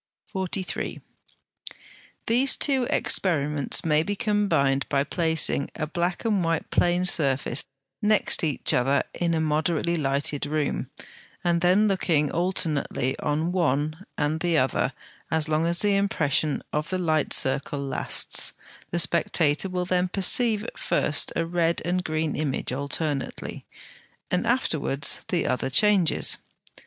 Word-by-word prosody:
43. 190 -1 -3 1.3
These 250 +4 +5
two 265 -4 +2
experiments 150 -6 0
may 150 -1 +3
be 205 +6 -3
combined 200 - +1
by 140 -1 +2
placing 160 -2 +1
a 155 - -2
black 175 +5 -3
and 210 -3 +2
a - - 0
white 165 -1 -2
plane 175 +1 +2
surface 140 -6 +1 0.4
next 210 -3 +3
each 150 -5 +1
other 135 +3 +2
in 170 -1 -1
a - - 0
moderately 160 +2 0
lighted 145 0 -1
room, 150 -1 -2 0.5
and 170 -1 +1
then 185 +4 +4
looking 165 -7 +1
alternately 160 -7 -1
on 155 +3 -1
one 155 -1 -1
and 150 +2 0
the 170 -1 +1
other 130 -3 +1 0.4
as 160 -1 +1
long 155 +1 +1
as 170 0 +2
the 205 -1 +2
impression 155 -7 0
of 150 +2 -2
the 185 - -1
light 160 -4 0
circle 140 +2 +2
lasts: 140 -1 0 0.4
the 175 - -2
spectator 170 0 +1
will 180 -1 -2
then 180 0 +1
perceive 210 +4 +1
at - - -8
first 150 - +1
a 165 - 0
red 170 0 0
and 180 +1 0
green 155 -1 -2
image 140 -4 -2
alternately, 140 +1 -4 0.6
and 180 - 0
afterwards 155 - +1
the 175 - -1
other 130 +1 -1
changes. 190 +3 +3
165 Hz, 135 wpm, -25 LUFS, 145-180 Hz, 1.3 s, These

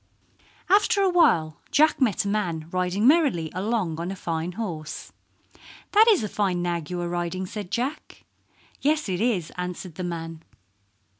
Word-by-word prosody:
After 400 +1 +4
awhile 300 - +3
Jack 310 0 +3
met 220 -6 +2
a - - -1
man 175 -7 -1
riding 185 +3 0
merrily 275 - +3
along 190 -5 -1
on 170 +2 -3
a 195 - -4
fine 170 -1 -3
horse. 165 -7 -6 0.8
"That 435 +2 +6
is 400 - +4
a - - -1
fine 190 -4 -1
nag 170 -3 -2
you 180 -1 -3
are 175 - -2
riding," 175 +2 -2
said 205 -1 -6
Jack. 260 +9 -4 0.6
"Yes, 305 0 +1
it 185 0 -2
is," 210 -9 0
answered 180 -1 -5
the 185 - -6
man. 165 -2 -5
185 Hz, 155 wpm, -25 LUFS, 170-235 Hz, 0.8 s, That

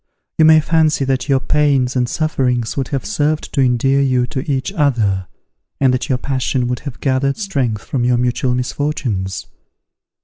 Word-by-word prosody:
You 160 - +6
may 155 0 +7
fancy 155 -2 +2
that 135 +2 -1
your 135 -1 +4
pains 135 -3 +1
and 125 -1 +1
sufferings 125 -7 -1
would 135 -2 -2
have 135 -2 -3
served 155 -6 -1
to 140 - +2
endear 135 +2 +2
you 130 -2 +2
to 135 +1 -5
each 135 -1 -1
other, 110 - +1 0.5
and 130 -2 +3
that 125 +4 -2
your 130 - +2
passion 130 -1 -1
would 125 -1 -2
have 140 -5 -8
gathered 135 0 0
strength 135 - -2
from 130 -3 -2
your 125 0 +2
mutual 125 +1 0
misfortunes. 125 -7 -2
130 Hz, 170 wpm, -18 LUFS, 125-145 Hz, 0.5 s, may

